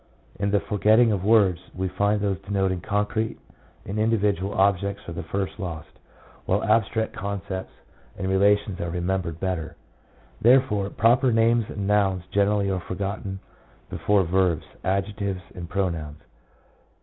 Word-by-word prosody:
In 100 0 0
the 100 0 +3
forgetting 110 +3 +3
of 100 -3 -1
words, 100 -5 +4 0.2
we 95 0 -1
find 100 +3 +1
those 100 -2 -1
denoting 95 -2 -1
concrete 105 +3 -1 0.5
and 100 +3 -3
individual 105 -3 +1
objects 100 +1 +1
are - - -5
the 85 - -5
first 95 +5 -4
lost, 85 -5 -5 0.6
while 100 +3 +1
abstract 110 0 +1
concepts 100 -1 -5 0.5
and 95 - -3
relations 100 0 +2
are 85 - -2
remembered 90 -1 -2
better. 90 -4 -3 0.7
There 125 +3 +7
fore 105 -6 -2
proper 120 +4 +3
names 115 0 +3
and 100 - -4
nouns 100 -3 +2
generally 100 0 +2
are 95 - -1
forgotten 95 +1 -4 0.5
before 100 -2 +2
verbs, 90 -1 +1 0.2
adjectives, 100 0 -2
and 85 -2 -8
pronouns. 85 -6 -2
100 Hz, 135 wpm, -25 LUFS, 95-105 Hz, 0.7 s, There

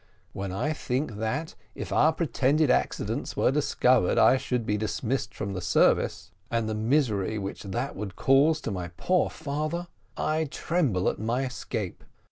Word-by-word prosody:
When 100 -1 -4
I 150 +12 -1
think 130 -5 -2
that 130 +9 -2 0.2
if - - -5
our 155 - +5
pretended 150 -3 +2
accidents - - -1
were - - +3
discovered, 130 -6 +2
I - - +6
should 125 -3 -2
be 105 - 0
dismissed 110 +4 -2
the 100 -3 -3
service, 85 - +2 0.2
and 115 -1 0
the 110 - -1
misery 110 -3 +1
which 95 -1 -5
that 95 -2 -3
would 100 -2 -5
cause 145 +4 +4
to 115 - -3
my 90 -3 -3
poor 180 -1 +2
father, 155 +3 -3 0.3
I 160 +1 0
tremble 145 - 0
at - - 0
my 120 +5 0
escape. 120 -6 -5
125 Hz, 155 wpm, -27 LUFS, 105-150 Hz, 0.3 s, I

